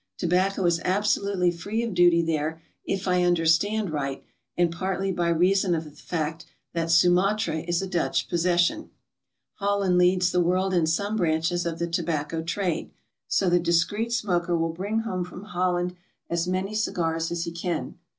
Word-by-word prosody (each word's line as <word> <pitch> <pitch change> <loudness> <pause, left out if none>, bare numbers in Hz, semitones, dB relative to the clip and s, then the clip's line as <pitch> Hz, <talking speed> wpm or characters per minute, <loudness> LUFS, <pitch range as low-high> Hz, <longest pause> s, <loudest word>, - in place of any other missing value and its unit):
Tobacco 185 +2 +1
is 170 -1 +2
absolutely 200 -1 +1
free 205 +7 -3
of 230 -4 -3
duty 175 -1 +5
there, 160 0 -1 0.2
if 195 0 -3
I 180 -1 +3
understand 175 +4 +2
right, 140 -3 -3 0.3
and 175 -1 +3
partly 190 +2 -2
by 175 -2 0
reason 180 +2 +3
of 160 - -2
the 150 - -12
fact 155 0 -4 0.3
that 165 -1 -1
Sumatra 180 +2 +3
is 170 +2 -1
a - - -3
Dutch 175 -2 0
possession, 175 - +1 0.7
Holland 200 -3 +1
leads 180 0 +3
the 180 - +2
world 185 +2 +1
in 170 -3 +2
some 200 +7 0
branches 170 0 0
of 165 -1 -3
the 170 - -1
tobacco 165 -2 -2
trade. 170 0 -2 0.4
So 195 - +1
'he 175 - +4
discreet 175 +7 +1
smoker 180 -7 0
will 165 0 -1
bring 205 +6 -2
home 185 -5 -3
from 180 +1 -9
Holland 180 -3 -1 0.4
as 170 0 0
many 185 +3 -2
cigars 165 -6 -1
as 170 -1 -2
he 170 - -4
can. 170 0 -4
175 Hz, 165 wpm, -25 LUFS, 165-190 Hz, 0.7 s, duty